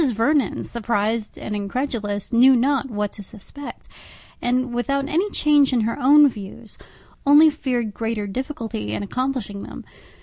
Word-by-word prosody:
Vernon, 255 +5 +1
surprized 220 -1 -2
and 210 - -5
incredulous, 205 -1 -3
knew 255 +3 +6
not 270 +2 +1
what 210 -3 -3
to 210 - -10
suspect, 220 +8 -11 0.5
and, 250 0 0
without 275 +3 -1
any 360 +7 0
change 295 -6 +3
in 240 - +2
her 225 +2 -1
own 290 +3 +7
views, 215 -1 -8 0.4
only 300 +2 +7
feared 245 -7 -2
greater 225 -1 -3
difficulty 220 - -5
in - - -3
accomplishing 245 -3 -3
them. - - -9
240 Hz, 140 wpm, -22 LUFS, 210-275 Hz, 0.5 s, own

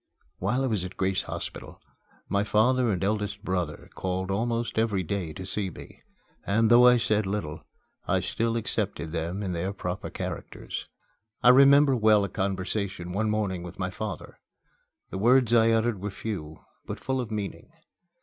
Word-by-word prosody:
While 115 +8 0
I - - +2
was 110 -8 0
at 90 0 -7
Grace 95 0 +1
Hospital, - - -7 0.5
my 100 0 +1
father 120 +3 +3
and 95 -1 -1
eldest 105 0 -1
brother 90 -6 -3
called 95 +1 -2
almost 115 +3 -1
every 105 -4 +1
day 90 -1 -3
to 95 +4 -7
see 100 0 -2
me, - - -12 0.4
and, 110 +3 +2
though 120 +1 +8
I 125 0 +7
said 110 -3 +1
little, 85 -6 -3 0.4
I - - +2
still 115 0 -1
accepted 105 -8 -2
them 85 +4 -3
in 95 - -2
their 90 +4 -2
proper 90 -1 -4
characters. - - -6 0.6
I 125 - +8
remember 140 +1 +7
well 110 -3 +4
a 100 - -2
conversation 95 -1 -2
one 105 +4 0
morning 100 -4 -1
with 90 +1 -9
my 90 0 -2
father. 100 -2 -6 0.7
The 95 - -4
words 120 +2 +4
I 115 -1 +6
uttered 115 -3 +1
were 105 - -2
few, 95 -7 -6 0.2
but - - -5
full 130 -1 -1
of 120 - -6
meaning. 105 - -5
105 Hz, 170 wpm, -27 LUFS, 95-115 Hz, 0.7 s, though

